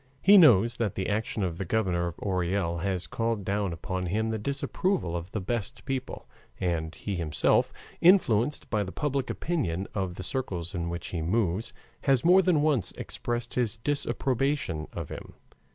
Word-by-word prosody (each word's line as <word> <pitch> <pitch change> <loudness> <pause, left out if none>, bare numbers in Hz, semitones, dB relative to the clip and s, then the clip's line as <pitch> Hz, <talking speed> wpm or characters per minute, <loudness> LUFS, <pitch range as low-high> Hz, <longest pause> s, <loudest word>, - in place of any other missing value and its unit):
He 200 +2 +8
knows 120 - +6
that 110 -5 -1
the 95 - -2
action 105 0 -1
of 85 -2 -2
the - - -1
Governor 90 -3 0
of 85 - -5
Orel 90 -2 -1
has 90 0 -1
called 115 -2 -2
down 100 -1 0
upon 90 +2 -4
him 110 +5 0
the 110 - -2
disapproval 140 - -1
of 85 +1 -4
the 110 - -2
best 115 +3 -4
people, 135 -1 -4 0.3
and 80 -3 -1
he 100 -3 -4
himself, 80 -4 +2 0.3
influenced 150 - +4
by 105 - +2
the 95 - -6
public 140 0 -2
opinion 100 - -2
of 95 -3 -2
the 95 - -6
circles 90 -7 -2
in 85 -2 -2
which 85 0 -5
he 85 - -3
moves, 95 +3 0 0.3
has 135 -1 +3
more 185 +2 +7
than 175 -6 +2
once 145 - +2
expressed 120 0 -4
his 120 -3 0
disapprobation 135 - -1
of 85 -4 -6
him. - - -9
105 Hz, 170 wpm, -28 LUFS, 90-130 Hz, 0.3 s, He